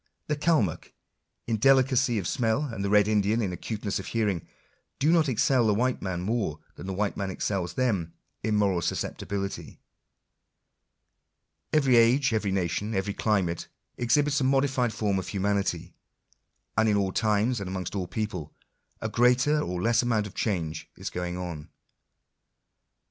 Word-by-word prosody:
The 150 Hz, -, -1 dB
Calmuck 145 Hz, -, 0 dB, 0.5 s
in 115 Hz, -1 st, 0 dB
delicacy 130 Hz, 0 st, +4 dB
of 95 Hz, -5 st, -2 dB
smell, 120 Hz, -, +1 dB
and 115 Hz, -8 st, -4 dB
the 100 Hz, -, -1 dB
red 105 Hz, 0 st, +5 dB
Indian 105 Hz, +1 st, +2 dB
in 100 Hz, -5 st, -1 dB
acuteness 105 Hz, +2 st, -3 dB
of 95 Hz, -, -7 dB
hearing, 105 Hz, -7 st, -1 dB, 0.5 s
do 150 Hz, +4 st, +3 dB
not 160 Hz, -4 st, +4 dB
excel 125 Hz, 0 st, +3 dB
the 105 Hz, -, +3 dB
white 125 Hz, +3 st, 0 dB
man 90 Hz, -2 st, -3 dB
more 100 Hz, -6 st, -1 dB, 0.2 s
than 95 Hz, -, -9 dB
the 95 Hz, -, -3 dB
white 100 Hz, +1 st, -1 dB
man 100 Hz, -2 st, -3 dB
excels 95 Hz, -2 st, -2 dB
them 100 Hz, -11 st, 0 dB, 0.3 s
in 110 Hz, 0 st, 0 dB
moral 100 Hz, -4 st, +2 dB
susceptibility. 100 Hz, +4 st, -4 dB, 1.9 s
Every 135 Hz, -5 st, +4 dB
age, 120 Hz, +2 st, +4 dB
every 105 Hz, -3 st, 0 dB
nation, 95 Hz, +3 st, -1 dB
every 95 Hz, +1 st, -1 dB
climate, 95 Hz, -6 st, 0 dB, 0.3 s
ex 120 Hz, -1 st, +2 dB
hibits 145 Hz, -1 st, +2 dB
a -, -, +2 dB
modified 130 Hz, -2 st, +2 dB
form 105 Hz, -2 st, 0 dB
of 95 Hz, -, -6 dB
humanity; 100 Hz, 0 st, -1 dB, 0.8 s
and 110 Hz, +1 st, +3 dB
in 105 Hz, -, +3 dB
all 95 Hz, -2 st, +1 dB
times, 110 Hz, +4 st, +1 dB
and 100 Hz, -2 st, -5 dB
amongst 95 Hz, -2 st, -4 dB
all 95 Hz, -3 st, -2 dB
peoples, 95 Hz, -9 st, -4 dB, 0.5 s
a 110 Hz, -, -1 dB
greater 125 Hz, +6 st, +3 dB
or 90 Hz, -6 st, -3 dB
less 115 Hz, +1 st, +3 dB
amount 115 Hz, -4 st, +1 dB
of 105 Hz, -, -8 dB
change 85 Hz, -7 st, -2 dB
is -, -, -5 dB
going 90 Hz, 0 st, -3 dB
on. 85 Hz, -5 st, -6 dB
105 Hz, 160 wpm, -27 LUFS, 95-120 Hz, 1.9 s, red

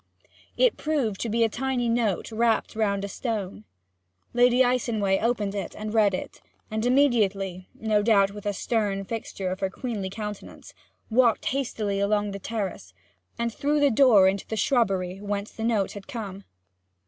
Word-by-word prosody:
It -, -, +3 dB
proved 270 Hz, -10 st, -1 dB
to 235 Hz, -, -2 dB
be 230 Hz, +2 st, +2 dB
a -, -, +4 dB
tiny 250 Hz, +1 st, -1 dB
note 230 Hz, -4 st, 0 dB
wrapped 225 Hz, 0 st, +1 dB
round 200 Hz, -2 st, 0 dB
a -, -, -4 dB
stone. 210 Hz, -1 st, -4 dB, 0.7 s
Lady 245 Hz, +1 st, +5 dB
Icenway 225 Hz, -6 st, +1 dB
opened 220 Hz, -3 st, 0 dB
it 200 Hz, -3 st, -5 dB
and 215 Hz, 0 st, -5 dB
read 210 Hz, -4 st, +4 dB
it, -, -, -7 dB, 0.3 s
and 220 Hz, 0 st, -1 dB
immediately 205 Hz, -9 st, +1 dB
(no 215 Hz, -2 st, +1 dB
doubt, 200 Hz, -2 st, +4 dB
with 205 Hz, 0 st, -7 dB
a 205 Hz, -, 0 dB
stern 200 Hz, -1 st, -1 dB
fixture 195 Hz, -4 st, -4 dB
of 185 Hz, -, -4 dB
her 190 Hz, -, 0 dB
queenly 210 Hz, -3 st, -4 dB
countenance) 210 Hz, 0 st, -8 dB, 0.4 s
walked 235 Hz, -1 st, +3 dB
hastily 215 Hz, -7 st, -2 dB
along 205 Hz, 0 st, +1 dB
the 200 Hz, -, -6 dB
terrace, 205 Hz, -1 st, -5 dB, 0.4 s
and 235 Hz, -1 st, -2 dB
through 295 Hz, +4 st, 0 dB
the 285 Hz, -1 st, +4 dB
door 220 Hz, -6 st, +6 dB
into 195 Hz, 0 st, -1 dB
the 220 Hz, -, -3 dB
shrubbery, 195 Hz, -7 st, +1 dB
whence 205 Hz, 0 st, -3 dB
the 220 Hz, -, -7 dB
note 220 Hz, -4 st, +1 dB
had 200 Hz, -1 st, -10 dB
come. 205 Hz, -7 st, -6 dB
215 Hz, 165 wpm, -26 LUFS, 200-235 Hz, 0.7 s, door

